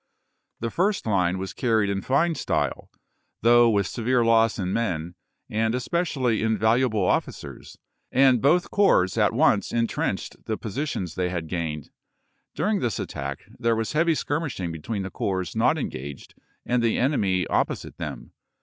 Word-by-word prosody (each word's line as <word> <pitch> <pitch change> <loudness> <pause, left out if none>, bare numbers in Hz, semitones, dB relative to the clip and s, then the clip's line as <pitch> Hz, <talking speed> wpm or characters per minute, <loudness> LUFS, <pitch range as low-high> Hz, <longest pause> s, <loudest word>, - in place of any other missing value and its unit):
The 115 0 -2
first 195 +3 0
line 95 -4 +1
was 95 0 -5
carried 110 -4 +1
in 100 0 -2
fine 155 - +2
style, - - -2 0.5
though 120 0 +6
with 100 -3 +2
severe 120 +5 +1
loss 115 -1 +4
in 95 -1 -2
men, 90 -7 -2 0.3
and 110 +2 0
especially 130 -3 0
in 110 0 +1
valuable 110 -1 +2
officers, - - -3 0.3
and 130 -3 +4
both 170 +6 +3
corps 185 - +3
at 105 -2 +4
once 125 -4 +2
intrenched 115 -1 -2
the 110 - -2
positions 110 - -4
they 90 -1 -1
had 85 -2 -3
gained. 80 -3 -4 0.6
During 210 0 +1
this 115 -6 -1
attack 70 0 -5 0.2
there 115 -1 +2
was 115 +3 -2
heavy 165 +1 +3
skirmishing 145 - -2
between 95 +6 -4
the 95 - -6
corps 95 -3 -2
not - - +3
engaged 70 +2 -6 0.3
and 125 0 +1
the 115 -1 +1
enemy 100 -9 +1
op - - +2
posite - - -8
them. - - -6
110 Hz, 155 wpm, -25 LUFS, 95-130 Hz, 0.6 s, though